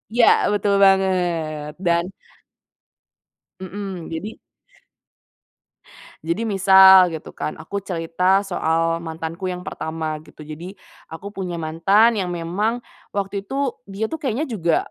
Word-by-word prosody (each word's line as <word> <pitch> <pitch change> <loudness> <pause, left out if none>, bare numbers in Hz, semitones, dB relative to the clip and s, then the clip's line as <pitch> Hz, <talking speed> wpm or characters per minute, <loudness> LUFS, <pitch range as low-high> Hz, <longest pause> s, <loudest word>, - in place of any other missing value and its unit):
Iya 240 - +5 0.3
betul 205 0 +1
banget, 175 -6 +1
dan 170 0 +3 1.6
Mhm, 190 -2 -6
jadi 180 +7 -6 1.8
jadi 170 +8 -2
misal 190 -2 +7
gitu 160 - -8
kan 150 - -5
aku 200 +6 -5
cerita 180 +2 0
soal 165 -2 0
mantanku 165 +2 -5
yang 180 0 -6
pertama 160 -1 -4
gitu, 155 0 -14
jadi 170 +6 -9 0.3
aku 200 +5 -8
punya 180 -4 -4
mantan 170 +8 +3
yang 190 -5 -2
memang 175 +7 -1 0.3
waktu 200 0 -3
itu 270 +3 -2 0.2
dia 200 +3 -3
tuh 320 +7 -5
kayaknya 265 +2 -1
juga 175 - 0
185 Hz, 115 wpm, -21 LUFS, 165-200 Hz, 1.8 s, misal